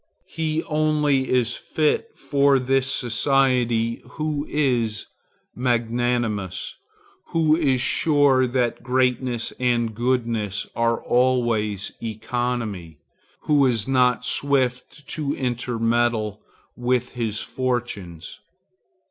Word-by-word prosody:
He 160 -1 -2
only 150 -3 +1
is 125 -2 +2
fit 160 - -1
for 140 -1 +3
this 130 +1 +1
society 120 -2 +1
who 155 -1 -2
is 120 -7 0 0.5
magnanimous; 120 -5 -1 0.5
who 160 -2 +3
is 135 -6 +1
sure 140 -2 +3
that 120 -1 -1
greatness 125 -1 0
and 120 -3 +1
goodness 115 -4 -1
are 115 0 0
always 120 -5 +1
economy; 110 -6 -3 0.4
who 145 -2 +3
is 115 -3 0
not 125 -2 +2
swift 140 +1 -1
to 145 -3 -2
intermeddle 120 -3 -1 0.3
with 125 0 0
his 115 -3 -2
fortunes. 120 -10 -4
125 Hz, 90 wpm, -23 LUFS, 115-135 Hz, 0.5 s, for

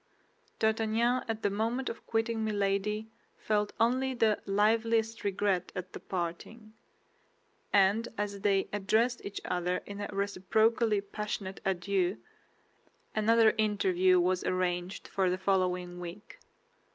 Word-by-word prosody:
D'Artagnan 225 +3 +1
at 225 -1 -3
the 200 - +2
moment 230 +5 -1
of 230 - -6
quitting 225 0 0
Milady 210 +1 -1 0.3
felt 210 -1 0
only 255 +3 +2
the 220 -3 +2
liveliest 225 +2 +2
regret 195 -2 0
at 185 0 -6
the - - -6
parting; 190 +5 -5 1.0
and 205 +4 +4
as 205 -1 -3
they 195 -1 +2
addressed 220 +4 +1
each 200 - -5
other 180 0 -1
in 205 0 -7
a 205 - -4
reciprocally 210 +3 +1
passionate 200 -1 -5
adieu, 190 0 0 1.0
another 220 +1 +4
interview 185 -4 +3
was 180 +1 +1
arranged 180 0 -2
for 190 -2 +1
the 180 - 0
following 180 -2 0
week. 175 +4 -9
205 Hz, 120 wpm, -30 LUFS, 185-220 Hz, 1.0 s, and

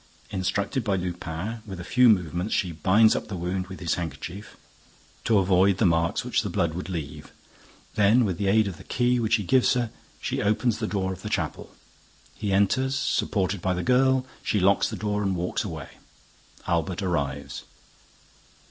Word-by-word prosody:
Instructed 100 +6 -1
by 100 -3 +1
Lupin, 90 +4 -4
with 95 -3 -7
a - - -5
few 125 +6 +4
movements 90 -1 +1
she 90 -4 0
binds 95 +8 +4
up - - -3
the 100 - -5
wound 90 +1 -3
with 95 -1 -9
his 85 -3 -1
handkerchief, 85 +5 -6 0.7
to 110 - +4
avoid 95 0 +3
the 105 - +2
marks 85 -1 +1
which - - +1
the - - -4
blood 85 -2 0
would 90 +3 -5
leave. 80 -6 -6 0.6
Then, 110 +4 +4
with 95 -4 -2
the 100 - 0
aid 110 +2 +4
of 95 -4 -6
the - - -12
key 125 0 +1
which 110 -1 +2
he 105 - -1
gives 130 +6 +3
her, 120 -3 -1 0.3
she - - -2
opens 110 +3 +1
the 110 - -2
door 95 -2 -1
of 95 - -11
the - - -5
chapel. - - -3 0.6
He 105 - -3
enters, 130 +8 +2
supported 100 -8 0
by 90 +1 0
the 90 - -2
girl. 130 +1 +3 0.2
She 105 - 0
locks 95 +2 +3
the - - -5
door 105 -1 -2
again 100 - 0
and - - -3
walks 90 +1 -2
away. - - -6 0.8
Albert 85 +3 -1
arrives. 70 -6 -2
95 Hz, 185 wpm, -26 LUFS, 90-110 Hz, 0.8 s, few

